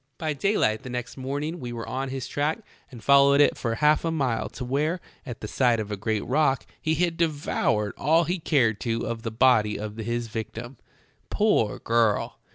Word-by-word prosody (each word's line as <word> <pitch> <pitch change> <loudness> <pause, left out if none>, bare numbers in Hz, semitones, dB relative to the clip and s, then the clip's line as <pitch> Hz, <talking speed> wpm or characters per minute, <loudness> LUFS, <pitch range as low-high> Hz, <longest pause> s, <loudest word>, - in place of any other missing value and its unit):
"By 155 -3 -2
daylight 140 - +1
the 130 - -8
next 125 0 -5
morning 145 +6 -4
we 125 -3 -6
were 115 -1 -6
on 135 +1 -3
his 135 -1 -4
track 150 - -1 0.3
and 120 -5 -12
followed 140 +1 +6
it 145 - +5
for 115 -2 -2
half 150 +4 +3
a 165 - 0
mile 135 -8 -1
to 125 - -7
where, 150 +7 0 0.3
at 120 -3 -7
the 105 - -5
side 120 0 +2
of 105 -1 -4
a - - -1
great 110 +1 -2
rock, 135 0 +1 0.2
he 160 0 +1
had 170 -1 0
devoured 145 - 0
all 160 +4 +3
he 175 +2 -2
cared 120 -10 +2
to 115 -1 -2
of 115 -1 -4
the 115 - -3
body 110 -2 +3
of 105 +1 -6
his 120 +1 -2
victim. 115 +2 -6 0.5
Poor 205 - +2
girl! 115 -2 +1
130 Hz, 195 wpm, -25 LUFS, 115-150 Hz, 0.5 s, followed